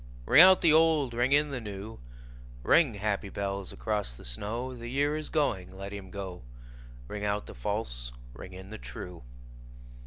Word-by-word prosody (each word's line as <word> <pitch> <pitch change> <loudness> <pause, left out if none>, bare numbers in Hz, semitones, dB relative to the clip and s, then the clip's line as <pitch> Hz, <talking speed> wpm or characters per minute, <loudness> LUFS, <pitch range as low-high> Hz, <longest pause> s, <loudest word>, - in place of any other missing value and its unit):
Ring 155 - +8
out 185 +1 +8
the 160 -3 +5
old, 155 -5 +4
ring 120 +3 +1
in 145 +1 +4
the 130 -3 -4
new, 105 +1 -7 0.6
Ring, 150 - +4
happy 100 0 -2
bells, 100 -1 -3
across 105 - -1
the 60 - -9
snow: 115 - -1
The 120 -1 -8
year 145 +4 +1
is 155 0 -2
going, 110 - 0
let 100 +1 -8
him 100 -2 -8
go; 95 -6 -7 0.7
Ring 105 +7 -6
out 105 0 -1
the - - -9
false, - - -3 0.2
ring 90 +9 -10
in 95 +2 -10
the 110 - -7
true. 90 -5 -8
105 Hz, 175 wpm, -29 LUFS, 95-135 Hz, 0.7 s, Ring